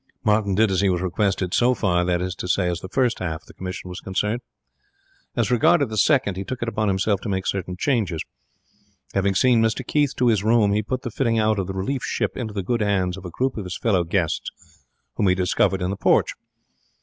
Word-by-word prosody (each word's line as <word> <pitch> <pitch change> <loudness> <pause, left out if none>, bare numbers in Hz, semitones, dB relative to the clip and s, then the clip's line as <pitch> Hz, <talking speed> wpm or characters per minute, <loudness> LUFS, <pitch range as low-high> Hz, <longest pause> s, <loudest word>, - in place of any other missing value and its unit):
Martin 105 -2 +2
did 110 0 +3
as 95 - +1
he 100 - +3
was 90 -1 +1
requested 95 0 -1
so 125 +1 +3
far, 90 -6 +1
that 90 0 0
is 90 0 -3
to 90 - -6
say, 90 0 +1
as 85 -1 -1
the 95 - -8
first 125 0 +1
half 80 -3 -4
of - - -25
the - - -15
commission 90 0 -6
was 90 0 -7
concerned. 105 +5 -2 0.9
As 120 -1 0
regarded 140 +3 +4
the 110 - -5
second, 105 -4 +2
he 95 - -3
took 120 +5 -5
it - - -3
upon 110 -2 -1
himself 100 +1 +1
to 110 - -5
make 95 -1 -2
certain 90 -2 -3
changes. 105 - 0 0.9
Having 100 0 +1
seen 120 +3 +4
Mr 110 0 0
Keith 145 -2 +1
to 125 - +1
his 105 -4 +2
room, 110 -2 +3
he 105 - +2
put 130 +4 -4
the 120 - -4
fitting 115 -1 0
out 110 -1 +2
of 95 - -2
the 95 - -4
relief 125 +8 -2
ship - - -2
into 115 -4 -4
the 100 -2 -3
good 115 +4 -1
hands 95 -3 +1
of 95 -1 -10
a - - -5
group 130 +9 -2
of 105 - -3
his 90 0 -5
fellow 100 -6 +1
guests 85 -1 -1 0.7
whom 100 - +2
he 90 - +4
discovered 95 +1 +1
in 90 - -1
the - - -2
porch. - - +2
100 Hz, 235 wpm, -23 LUFS, 90-115 Hz, 0.9 s, regarded